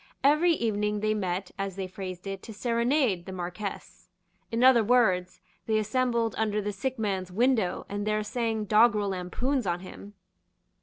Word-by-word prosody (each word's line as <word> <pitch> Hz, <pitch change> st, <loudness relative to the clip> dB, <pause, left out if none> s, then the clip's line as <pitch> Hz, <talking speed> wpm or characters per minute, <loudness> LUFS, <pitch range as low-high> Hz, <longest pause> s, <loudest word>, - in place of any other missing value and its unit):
Every 305 Hz, +5 st, +5 dB
evening 210 Hz, -5 st, -1 dB
they 215 Hz, 0 st, +1 dB
met, 190 Hz, -2 st, -2 dB
as 195 Hz, -2 st, -3 dB
they 195 Hz, -1 st, -3 dB
phrased 185 Hz, -1 st, -7 dB
it, 195 Hz, -1 st, -5 dB
to 225 Hz, -, -9 dB
serenade 235 Hz, -, +1 dB
the -, -, -5 dB
Marquess. 185 Hz, +3 st, -6 dB, 0.4 s
In 230 Hz, +2 st, +1 dB
other 255 Hz, -3 st, +7 dB
words 200 Hz, -6 st, +2 dB, 0.3 s
they 220 Hz, -1 st, +2 dB
assembled 235 Hz, +1 st, 0 dB
under 215 Hz, -1 st, +1 dB
the 210 Hz, 0 st, -3 dB
sick 260 Hz, +6 st, -3 dB
man's 190 Hz, -4 st, -2 dB
window, 220 Hz, -3 st, +1 dB
and 205 Hz, +1 st, -4 dB
there 215 Hz, 0 st, +1 dB
sang 225 Hz, -1 st, -2 dB
doggrel 210 Hz, -1 st, +4 dB
lampoons 200 Hz, +7 st, -2 dB
on 175 Hz, 0 st, -1 dB
him. 200 Hz, +2 st, -11 dB
210 Hz, 160 wpm, -28 LUFS, 190-235 Hz, 0.4 s, other